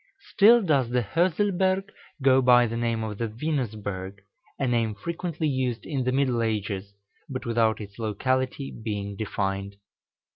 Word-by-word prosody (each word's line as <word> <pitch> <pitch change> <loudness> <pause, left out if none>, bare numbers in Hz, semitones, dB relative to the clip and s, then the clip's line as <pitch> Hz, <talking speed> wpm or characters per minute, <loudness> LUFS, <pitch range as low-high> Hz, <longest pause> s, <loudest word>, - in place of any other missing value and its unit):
Still 230 +3 +7
does 140 -9 +2
the 125 0 +1
Hörselberg 185 - +1 0.4
go 135 -1 +5
by 125 -1 +6
the 115 0 -3
name 115 -1 -1
of 105 -2 -5
the 115 - 0
Venusberg, 110 -7 -3 0.4
a 135 - 0
name 115 -3 +1
frequently 170 - -3
used 130 -4 -1
in 135 -5 -2
the 130 - +1
middle 130 -3 +1
ages, 100 -3 -2 0.3
but 130 -1 -5
without 115 -2 +2
its 100 0 -10
locality 130 +5 -1
being 100 -2 -4
defined. 100 -1 -3
120 Hz, 145 wpm, -26 LUFS, 105-140 Hz, 0.4 s, Still